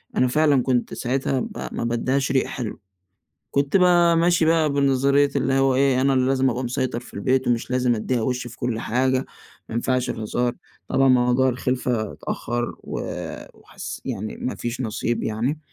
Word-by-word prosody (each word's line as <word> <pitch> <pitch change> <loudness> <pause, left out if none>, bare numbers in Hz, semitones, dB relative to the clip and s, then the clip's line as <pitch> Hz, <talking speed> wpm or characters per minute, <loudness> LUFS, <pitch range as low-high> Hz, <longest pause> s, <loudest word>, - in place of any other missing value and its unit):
أنا 125 - +3
فعلًا 145 0 +3
كنت 125 -2 0
ساعتها 130 +1 -1 0.2
ما - - -5
ما - - -3
بادِّيهاش 130 +4 0
ريق 130 - +2
حلو. 120 -4 -5 0.7
كنت 140 +5 +1
ب - - +4 0.4
ماشي 170 -1 +3
بقى 160 -2 +3
بنظرية 140 0 +3
اللي 135 - +1
هو 135 -1 +3
إيه، 135 -1 +3
أنا 135 0 +3
اللي 130 0 +2
لازم 135 0 +2
أبقى 125 +2 -3
مسيطر 120 -1 -2
في 120 - -15
البيت، 130 +6 +1
ومش 120 +1 0
لازم 125 -1 +2
أدِّيها 115 +2 -1
وِش 125 +1 -2
في 120 - -10
كل 115 -2 -2
حاجة، 130 +3 0 0.4
ما - - -7
ينفعش 125 +1 0
الهزار. 120 +2 -1 0.4
طبعًا 135 0 +3
موضوع 125 +1 +4
الخِلفة 125 -3 -1
اتأخَّر، 120 0 -3
و - - -4 0.5
وحس - - -8
يعني 110 -5 -4
ما 130 - -3
فيش 120 +2 -4
نصيب 115 0 -2
يعني. 120 +8 -1
130 Hz, 170 wpm, -23 LUFS, 120-135 Hz, 0.7 s, ب